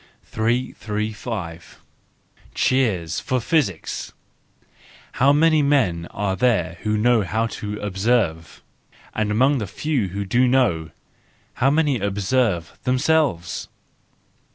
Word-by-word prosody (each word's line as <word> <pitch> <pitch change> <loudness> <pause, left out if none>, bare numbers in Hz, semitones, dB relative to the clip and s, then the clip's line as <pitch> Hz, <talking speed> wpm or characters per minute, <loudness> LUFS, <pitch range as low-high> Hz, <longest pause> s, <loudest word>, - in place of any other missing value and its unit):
335 110 -5 -3 0.8
Cheers 100 -12 +1
for 130 -1 -1
Physics! 115 - -1 1.0
—How 135 +2 +3
many 155 +1 +4
men 110 -13 +1
are 95 -1 -2
there 90 -8 +1
who 105 0 0
know 120 +1 +3
how 110 +4 -1
to 105 -2 -5
observe? 95 -4 -1 0.5
And 110 -1 -1
among 130 +6 +3
the 105 - -3
few 130 +2 -1
who 100 +2 -4
do 120 +6 +3
know,—how 120 - -2
many 145 -3 +2
observe 100 -2 -1
themselves? 130 - +1
110 Hz, 100 wpm, -22 LUFS, 95-130 Hz, 1.0 s, many